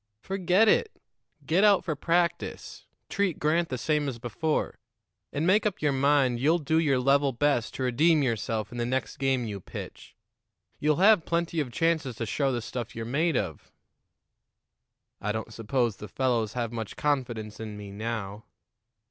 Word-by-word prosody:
Forget 190 +2 +2
it. 450 - +2 0.5
Get 180 +5 +2
out 205 -2 +5
for 160 -4 -1
practice, 170 +4 -1 0.2
treat 200 -5 0
Grant 165 +3 +1
the 130 - -2
same 150 +3 0
as 125 - -6
before, 125 +7 -2 0.5
and 145 +3 -1
make 195 +5 +4
up 210 -3 -1
your 150 -1 +1
mind 135 -2 +2
you'll 155 +6 +3
do 160 0 +1
your 145 -5 +2
level 140 +2 +3
best 130 -2 0
to 130 - -3
redeem 150 +5 +3
yourself 110 -2 -2
in 120 - -6
the 120 - 0
next 130 +1 -2
game 135 -2 +1
you 105 -3 -5
pitch. - - -9 0.6
You'll 150 0 +2
have 195 0 +5
plenty 170 -1 0
of 135 -5 -2
chances 160 -3 0
to 115 - -3
show 135 +4 0
the 120 -3 -2
stuff 120 -1 -6
you're 115 0 -4
made 145 +4 +1
of." 80 -7 -4 1.5
"I 105 - -1
don't 110 +1 -5
suppose 115 0 -1
the 105 - -8
fellows 115 -1 0
have 120 -2 -2
much 115 -3 -5
confidence 120 -7 -2
in 110 -2 -6
me 100 -1 -8
now." 105 -1 -5
135 Hz, 170 wpm, -27 LUFS, 115-160 Hz, 1.5 s, out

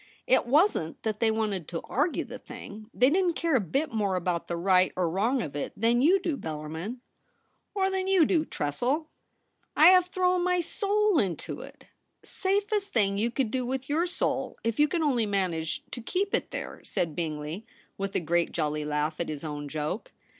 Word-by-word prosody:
It 255 - +3
wasn't 285 - +2
that 215 -2 -2
they 225 - +3
wanted 210 -7 -1
to 165 -2 -4
argue 295 +7 0
the - - -9
thing. 215 +1 -10
They 255 +3 +3
didn't 355 -1 +2
care 335 -1 0
a - - +5
bit 270 - -1
more 205 -4 0
about 180 -1 -1
the 170 - -2
right 185 +1 +4
or 180 -2 +1
wrong 220 +10 +1
of 145 -4 -7
it 145 - -3
than 235 +3 +3
you 355 +8 +5
do, 335 -5 -1
Bellarmin.' 160 - -5 0.4
' - - -46
Or 385 -1 +1
than 380 0 -1
you 380 -4 +5
do, 320 -2 +2
Tressel' 260 - -2 0.3
' - - -45
I - - +11
have 365 -1 +6
thrown 365 -1 +1
my 360 0 +2
soul 410 +1 +1
into 180 -6 -2
it.' - - -12 0.3
* - - -50
Safest 400 +1 0
thing 200 -3 +2
you 230 +3 +2
could 235 -2 -1
do 255 0 0
with 265 +2 -3
your 325 +5 +1
soul, 355 - -2
if 230 +2 -1
you 295 - +6
can 330 +1 -1
only 245 -7 +2
manage 180 -5 -1
to 245 - -5
keep 385 - -1
it - - 0
there,' - - -6
said 165 -4 -2
Bingley, 160 +5 -4 0.3
with 195 0 -4
a - - +3
great 170 0 0
jolly 150 -1 -1
laugh 150 +1 -1
at 170 - -2
his 150 -1 -5
own 145 -2 -5
joke. 155 +7 -4
225 Hz, 205 wpm, -28 LUFS, -, 0.4 s, I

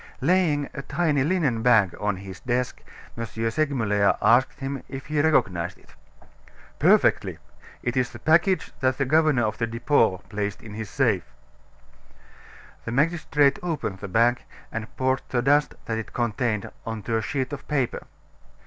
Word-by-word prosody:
Laying 150 -2 +2
a 140 - -5
tiny 150 -2 0
linen 150 -8 +1
bag 110 -6 +4
on 105 -1 0
his 95 -1 -9
desk, 125 0 -2 0.3
M. 115 - -4 0.3
Segmuller 110 -8 +1
asked 125 +5 +3
him 135 -1 -4
if 135 -1 -7
he 150 0 0
recognized 95 - +1
it. - - -22 0.9
"Perfectly! - - +3 0.5
It 120 - -1
is 130 -1 +1
the 120 - -10
package 170 - +2
that 130 0 +1
the 140 - +1
governor 155 -2 +3
of 105 -1 -3
the 115 - 0
Depot 115 -3 +2
placed 105 -2 -4
in 105 - -9
his 110 0 -6
safe." 100 - 0 1.5
The 115 - -3
magistrate 150 0 +2
opened 155 - -3
the 100 - -6
bag, 120 +5 +2 0.3
and 115 0 -5
poured 130 0 +1
the 120 -2 0
dust 145 +2 +3
that 115 -1 -2
it 110 - -8
contained 115 -3 -1
on 110 -2 -5
to 115 -1 0
a - - 0
sheet 130 +4 -3
of 140 - -7
paper. 135 -5 -1
125 Hz, 160 wpm, -25 LUFS, 110-145 Hz, 1.5 s, bag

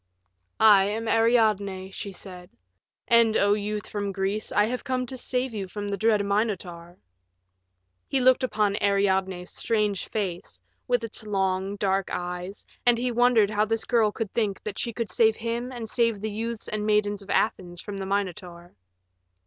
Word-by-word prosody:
"I 205 -3 +7
am 220 +3 -3
Ariadne," 215 -5 +2
she 200 - -6
said, 180 -2 -10 0.6
"and, 230 -2 +5
O 205 0 +4
youth 210 0 -3
from 205 -1 -3
Greece, 195 +2 -2
I 205 - +3
have 250 +3 -3
come 255 -2 -1
to 260 - -6
save 255 0 -1
you 200 -3 -4
from 205 +2 -5
the 200 - -1
dread 210 0 +2
Minotaur." 185 -5 -2 1.1
He 270 - 0
looked 255 +1 +4
upon 210 -5 0
Ariadne's 190 -2 +1
strange 210 -4 0
face 180 - -4 0.3
with 245 -1 +1
its 225 -1 -7
long, 190 -1 0
dark 195 -1 0
eyes, 180 +2 -5 0.2
and 240 -1 +4
he 245 +1 -1
wondered 240 -3 +4
how 210 0 +2
this 225 +1 -1
girl 225 -3 +3
could 215 -1 -5
think 210 -4 -1
that 210 -2 -5
she 235 - -1
could 225 -3 -4
save 220 +2 +4
him 235 +3 -3
and 240 -3 -6
save 230 -2 +1
the 215 +1 -3
youths 225 +1 -4
and 215 -1 -3
maidens 210 -1 +1
of 195 - -14
Athens 175 -5 0
from 205 +1 -6
the 195 - -4
Minotaur. 180 -3 -4
210 Hz, 170 wpm, -26 LUFS, 195-225 Hz, 1.1 s, I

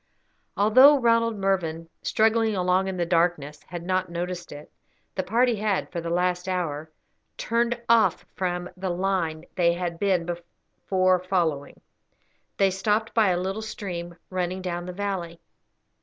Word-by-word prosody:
Although 255 +8 +7
Ronald 230 -2 +3
Mervyn, 170 -4 -1
struggling 220 0 +2
along 185 +1 +2
in 190 -1 -3
the 175 - 0
darkness, 165 -4 0
had 175 0 -6
not 185 0 0
noticed 175 +1 -5
it, 145 +1 -10 0.4
the 190 - -1
party 235 +5 +2
had 205 -2 -1
for 170 - -3
the 165 - -4
last 180 +1 0
hour 160 -4 -2 0.5
turned 235 +1 0
off 230 -1 +3
from 180 -1 -2
the 190 0 -4
line 175 -3 -1
they 170 -2 +3
had 175 -1 -4
before 185 0 0
been 180 - -15
following. 160 -7 -1 0.8
They 195 -1 +3
stopped 210 +4 0
by 220 -4 +4
a 175 -1 +1
little 190 +4 -3
stream, 175 -5 -6 0.2
running 185 0 -2
down 175 -1 -4
the - - -4
valley. 180 -4 -4
185 Hz, 145 wpm, -25 LUFS, 175-200 Hz, 0.8 s, Although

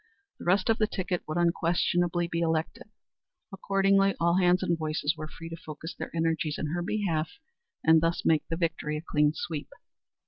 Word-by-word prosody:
The - - -9
rest 185 +2 +3
of 225 - 0
the 215 - +3
ticket 185 -3 -2
would 155 +2 -3
unquestionably 175 0 +1
be 170 0 -2
elected; 165 +4 -1 0.6
accordingly 195 0 +2
all 170 +1 +3
hands 180 0 +3
and 170 - +1
voices 155 -1 -1
were 155 -1 -6
free 165 +1 -10
to 165 - -6
focus 160 0 -8
their - - -6
energies 165 -1 0
in 150 +1 -3
her 175 - -1
behalf 175 -5 -1 0.5
and 160 0 +6
thus 165 +1 0
make 155 -2 +3
the 165 - -3
victory 160 -3 -1
a 150 - -7
clean 150 0 +3
sweep. 155 -4 -4
165 Hz, 180 wpm, -28 LUFS, 160-180 Hz, 0.6 s, and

